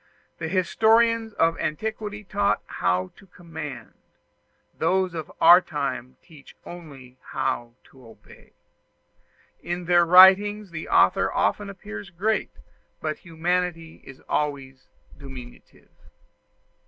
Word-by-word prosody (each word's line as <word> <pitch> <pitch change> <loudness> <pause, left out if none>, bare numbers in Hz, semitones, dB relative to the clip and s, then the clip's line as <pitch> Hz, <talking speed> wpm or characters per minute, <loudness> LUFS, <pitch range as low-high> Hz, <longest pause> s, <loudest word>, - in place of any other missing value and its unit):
The 165 - -3
historians 225 +5 +2
of 165 -2 +1
antiquity 210 +4 -4
taught 200 +1 0
how 90 +1 -1
to 195 - -18
command: 165 -6 -9 0.8
those 185 +2 0
of 160 -3 -6
our 175 +2 +8
time 130 -6 -5
teach 150 -4 -17
only 140 -7 -12
how 120 0 -2 0.2
to 130 -3 -17
obey; 115 - -18 1.1
in 175 0 -5
their 175 0 +4
writings 190 +3 +6
the 160 -1 -7
author - - +3
often 205 -1 -1
appears 105 - -9
great, 205 +5 -1 0.5
but 155 -1 -4
humanity 170 -1 -3
is 135 -1 -14
always 135 -3 -4 0.3
diminutive. 130 -3 -13
170 Hz, 105 wpm, -24 LUFS, 140-190 Hz, 1.1 s, our